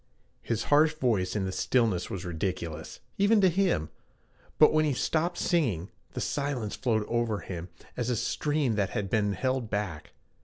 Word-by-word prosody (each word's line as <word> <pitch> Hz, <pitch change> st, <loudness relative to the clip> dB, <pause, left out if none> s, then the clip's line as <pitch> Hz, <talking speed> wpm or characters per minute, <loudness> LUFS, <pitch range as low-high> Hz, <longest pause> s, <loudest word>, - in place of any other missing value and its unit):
His 115 Hz, -1 st, -2 dB
harsh 155 Hz, +1 st, +4 dB
voice 110 Hz, -11 st, 0 dB
in 100 Hz, -2 st, 0 dB
the 95 Hz, -, -2 dB
stillness 110 Hz, -4 st, +1 dB
was 95 Hz, -1 st, -5 dB
ridiculous, 85 Hz, -2 st, -4 dB, 0.2 s
even 205 Hz, +2 st, +5 dB
to 190 Hz, -, +6 dB
him, 175 Hz, -, +1 dB, 0.7 s
but 155 Hz, -, +7 dB
when 155 Hz, 0 st, +4 dB
he 150 Hz, -2 st, +1 dB
stopped 165 Hz, +7 st, 0 dB
singing, 115 Hz, -, 0 dB, 0.2 s
the -, -, -4 dB
silence 140 Hz, -7 st, -2 dB
flowed 110 Hz, -5 st, 0 dB
over 115 Hz, -3 st, 0 dB
him 90 Hz, -1 st, -6 dB, 0.3 s
as 125 Hz, -1 st, -2 dB
a 125 Hz, -, +1 dB
stream 140 Hz, +3 st, 0 dB
that 100 Hz, -1 st, +1 dB
had 100 Hz, -2 st, -3 dB
been 105 Hz, -2 st, +2 dB
held 130 Hz, +2 st, -1 dB
back. 100 Hz, -8 st, -4 dB
115 Hz, 165 wpm, -28 LUFS, 95-145 Hz, 0.7 s, but